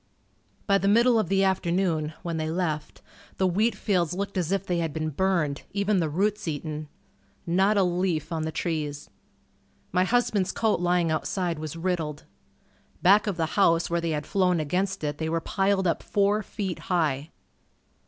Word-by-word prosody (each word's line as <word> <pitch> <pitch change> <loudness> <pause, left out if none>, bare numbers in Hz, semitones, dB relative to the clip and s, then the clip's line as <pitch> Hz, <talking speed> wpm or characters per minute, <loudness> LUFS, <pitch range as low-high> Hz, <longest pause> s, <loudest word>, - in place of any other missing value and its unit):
By 200 -1 +3
the 195 - 0
middle 230 +3 +5
of 200 -6 -1
the 195 0 +3
afternoon, 170 -4 0
when 170 -2 -3
they 155 0 -2
left, 160 -3 -3 0.3
the 190 - +2
wheat 205 +5 +2
fields 180 -5 0
looked 200 +1 -4
as 180 -2 -1
if 195 0 0
they 175 -2 0
had 165 -3 -2
been 155 0 -2
burned, 160 -3 0
even 200 0 +1
the 160 -3 0
roots 205 +5 0
eaten. 155 0 -4 0.6
Not 190 +5 +2
a 195 - +5
leaf 175 -3 -1
on 165 -1 -1
the 160 0 -2
trees. 155 -3 -3 0.8
My 180 +1 +3
husband's 210 -3 +1
coat 220 -4 +1
lying 175 -2 +2
outside 170 +1 -1
was 155 0 -5
riddled. 165 -4 -2 0.8
Back 205 +4 +5
of 195 -4 -1
the 165 - +1 0.2
house 165 -2 +3
where 170 0 +1
they 165 - -1
had 150 -2 -2
flown 180 -3 +2
against 185 +5 -1
it 145 -1 -2
they 160 0 -1
were 165 +1 0
piled 195 +2 0
up 170 - +1
four 205 +1 +1
feet 195 -3 -4
high. 155 -5 -1
175 Hz, 175 wpm, -26 LUFS, 160-195 Hz, 0.8 s, middle